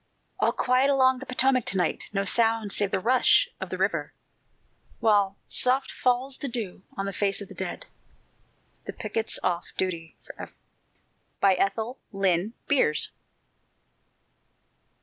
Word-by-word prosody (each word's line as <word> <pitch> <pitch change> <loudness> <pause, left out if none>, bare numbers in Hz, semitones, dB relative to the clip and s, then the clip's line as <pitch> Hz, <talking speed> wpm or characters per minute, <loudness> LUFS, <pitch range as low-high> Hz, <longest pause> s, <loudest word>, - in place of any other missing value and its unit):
All - - +3
quiet 255 +2 +2
along 260 -2 +3
the 270 - -9
Potomac 255 0 +2
to 185 +1 0
night 180 - -1
No 200 -1 -1
sound 225 0 +2
save 205 - +2
the 195 - -1
rush 255 - +4
of - - -5
the - - -4
river, - - -1 0.8
While 205 -3 +2
soft 260 +2 +2
falls 255 +2 -1
the 280 - -3
dew 225 -8 -5 0.2
on 195 - -2
the 195 - -4
face 200 0 0
of 200 - -9
the - - -10
dead - - -5 1.0
The - - -6
picket's 225 -1 0
off 175 -1 0
duty 165 -5 -3
forever! - - -10 0.9
ETHEL 200 +6 +1
LYNN 195 +1 0
BEERS. 255 - +2
220 Hz, 135 wpm, -26 LUFS, 195-255 Hz, 1.0 s, rush